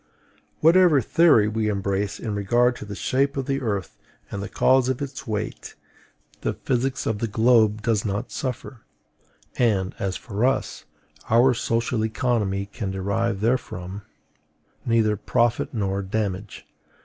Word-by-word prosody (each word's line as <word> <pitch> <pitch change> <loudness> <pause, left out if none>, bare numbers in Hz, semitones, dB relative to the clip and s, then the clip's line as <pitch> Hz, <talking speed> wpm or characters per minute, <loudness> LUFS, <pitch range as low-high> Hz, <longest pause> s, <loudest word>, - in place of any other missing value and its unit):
Whatever 170 -2 +6
theory 135 -3 +4
we 110 0 -1
embrace 100 -1 -1
in 110 -3 -4
regard 120 +5 +2
to - - -8
the 100 0 -7
shape 140 +6 0
of 135 - -1
the 135 0 -1
earth 100 -7 -3 0.3
and 100 - -4
the 100 - -5
cause 130 -1 +3
of 130 - -1
its 140 -2 -6
weight, 105 -2 -4 0.7
the - - -1
physics 130 +1 -1
of 110 -2 -1
the 115 - -1
globe 110 -1 +3
does 110 -3 +1
not 105 +3 -3
suffer; 130 -3 -5 0.8
and, 100 -6 +2
as 95 -1 -2
for 105 0 -4
us, 130 +1 0 0.4
our 120 +3 +5
social 115 0 -1
economy 110 -4 0
can 100 0 -5
derive 100 +2 -1
therefrom 105 -5 -2 0.9
neither 110 -2 +3
profit 120 +3 0
nor 100 -3 -1
damage. 100 0 -4
110 Hz, 140 wpm, -24 LUFS, 100-125 Hz, 0.9 s, Whatever